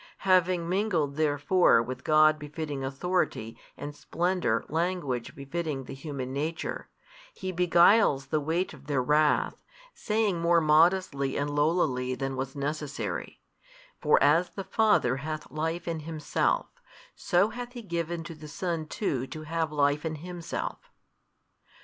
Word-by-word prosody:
Having 180 -2 +3
mingled 175 -7 0
therefore 155 +2 +3
with 130 +2 -6
God 155 0 +5
befitting 150 -2 -5
Authority 135 -5 -1 0.2
and 145 0 -6
Splendour 175 -10 0
language 160 -7 -2
befitting 140 0 -4
the 135 - -8
human 135 -2 -5
nature, 155 +4 -3 0.5
He 185 - -4
beguiles 175 -3 +4
the 155 +3 0
weight 165 +5 -1
of 140 -1 -15
their 140 -4 +1
wrath, 150 +2 +2 0.4
saying 210 -5 0
more 170 0 +4
modestly 155 -3 +3
and 145 +1 -1
lowlily 145 -4 +1
|272 - - -15
than 135 -1 -3
was 135 +1 -4
necessary, 145 0 -4 0.6
For 150 - +4
as 160 +5 +4
the 195 - -6
Father 190 - +2
hath 155 0 -5
life 160 +4 -3
in 165 -1 -2
Himself, 155 -1 -1 0.5
so 180 +4 +2
hath 245 +1 -7
He 240 -2 -8
given 170 -2 -3
to 165 - -8
the 155 -1 -11
Son 165 -1 -3
too 135 - -2
to 155 +3 -8
have 160 0 -2
life 145 0 +1
in 160 -1 -2
Himself. 175 +2 -5
155 Hz, 140 wpm, -28 LUFS, 140-175 Hz, 0.6 s, God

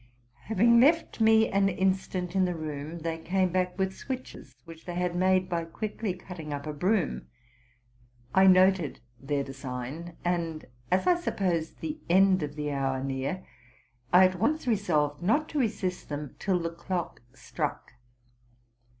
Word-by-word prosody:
Having 230 +3 +4
left 305 -1 +3
me 220 0 +5
an 195 0 +2
instant 185 -1 -1
in 190 -1 +4
the 180 -1 -2
room, 155 0 -5
they 165 0 -3
came 185 +3 +1
back 180 0 0
with 190 -1 0
switches, 255 - -7
which 165 -1 -12
they 175 - -5
had 180 0 -1
made 185 0 +3
by 170 -2 -1
quickly 205 +3 -4
cutting 175 -4 -9
up 140 0 -4
a 150 - -4
broom. 180 +3 0 1.1
I 190 0 +6
noted 185 -3 +4 0.2
their 140 +1 -1
design; 135 +5 -7
and, 165 -3 -1 0.2
as 185 +1 +2
I 355 -1 +4
supposed 175 - -2
the 310 0 -4
end 190 +1 +5
of 145 -1 -4
the 150 -1 -3
hour 135 -1 -1
near, 135 +7 -3 0.7
I 180 +1 +8
at 185 -1 0
once 305 +9 +1
resolved 155 - +1
not 260 - +2
to 300 - -2
resist 190 -7 -2
them 145 -2 -5
till 190 -3 +1
the 165 -1 -3
clock 170 -2 -4
struck. 135 +1 -4
180 Hz, 155 wpm, -28 LUFS, 155-195 Hz, 1.1 s, I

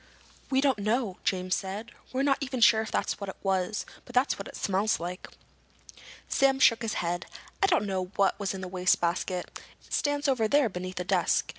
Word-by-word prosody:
"We 265 0 +3
don't 270 -6 +2
know," 215 -1 0
James 185 -1 0
said. 195 +4 -3 0.2
"We're 260 +1 0
not 275 -1 +2
even 260 -2 -3
sure 230 -1 +6
if 220 - -5
that's - - -1
what 200 -1 -5
it - - -6
was, 190 +1 0 0.2
but 245 - -13
that's 250 -2 +2
what 200 - -6
it - - -10
smells 200 +3 +1
like." 180 +2 -6 1.0
Sam 270 0 +3
shook 230 -3 +5
his 225 -2 -2
head. 175 +1 -2 0.3
"I 390 - +5
don't 345 - +2
know 190 -2 -1
what 195 -1 +2
was 200 -1 -2
in 190 - -6
the 185 0 +2
basket. 180 +1 -2 0.3
It - - -11
stands 290 0 +1
over 250 -5 +2
there, 285 0 +3
beneath 185 0 -6
that 180 - -3
desk." - - +2
205 Hz, 200 wpm, -28 LUFS, 185-255 Hz, 1.0 s, sure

